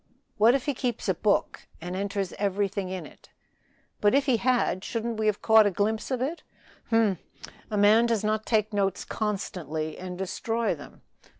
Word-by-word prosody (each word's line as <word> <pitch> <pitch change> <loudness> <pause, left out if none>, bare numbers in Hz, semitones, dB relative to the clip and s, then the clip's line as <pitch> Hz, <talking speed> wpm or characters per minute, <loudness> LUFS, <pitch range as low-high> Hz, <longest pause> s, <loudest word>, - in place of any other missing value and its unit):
"What 230 +4 +6
if 270 - -2
he 285 - 0
keeps 245 -4 -3
a 190 - +3
book 200 +4 0
and 175 +2 -5
enters 200 -1 -2
everything 200 -1 -1
in 185 -1 -5
it?" - - -16 0.7
"But 205 +4 +3
if 280 - +3
he 260 -4 +3
had, 240 -6 +1
shouldn't 230 -1 -3
we 215 - +1
have 210 -1 0
caught 220 -1 +6
a - - +3
glimpse 210 +3 -1
of 255 -2 -1
it?" 320 +6 -3 0.5
"Humph! 225 -6 +3 0.5
A 210 - -2
man 215 +3 +5
does 230 -3 0
not 215 0 0
take 215 -1 +1
notes 200 -1 0
constantly 165 -7 -3
and 180 0 -6
destroy 225 +5 -1
them. - - -12
210 Hz, 180 wpm, -27 LUFS, 195-230 Hz, 0.7 s, What